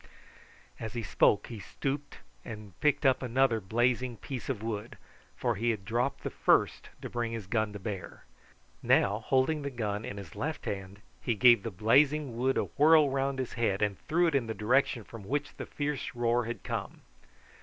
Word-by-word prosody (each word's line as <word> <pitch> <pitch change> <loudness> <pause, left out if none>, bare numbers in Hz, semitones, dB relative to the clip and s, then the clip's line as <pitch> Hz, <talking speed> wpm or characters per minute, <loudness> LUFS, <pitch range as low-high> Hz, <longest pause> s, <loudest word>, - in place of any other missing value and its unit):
As 110 - -5
he 120 -2 -3
spoke 95 +2 +3
he 115 -3 -8
stooped 140 +6 -4 0.3
and 105 -3 -9
picked 150 0 +2
up 130 -1 +4
another 125 -2 +2
blazing 120 +4 0
piece 130 +5 -6
of 115 -5 -3
wood, 110 0 -4 0.4
for - - 0
he 115 +4 -1
had 105 -4 -2
dropped 120 +5 -1
the - - -3
first - - +2
to - - -3
bring 120 -1 -3
his 115 -4 -5
gun 110 +1 0
to - - -5
bear. 100 -2 -6 0.6
Now, 100 +2 +3
holding 130 +6 +1
the 140 - -3
gun 105 -5 -3
in 105 - -6
his 95 -6 -9
left 155 +2 -4
hand, 100 0 -5 0.2
he 120 - 0
gave 120 0 +6
the 115 - -4
blazing 135 - +3
wood 130 +3 +1
a - - +2
whirl 150 -1 +4
round 135 0 0
his 130 -2 -3
head 110 -4 0
and 100 -2 -1
threw 175 +3 +3
it 165 - +1
in 135 -5 +1
the 110 - -3
direction 120 +2 +2
from 115 0 -11
which 145 +8 -3
the - - -6
fierce 145 -3 -3
roar 120 0 +1
had 120 +1 -5
come. - - -5
120 Hz, 190 wpm, -30 LUFS, 105-135 Hz, 0.6 s, gave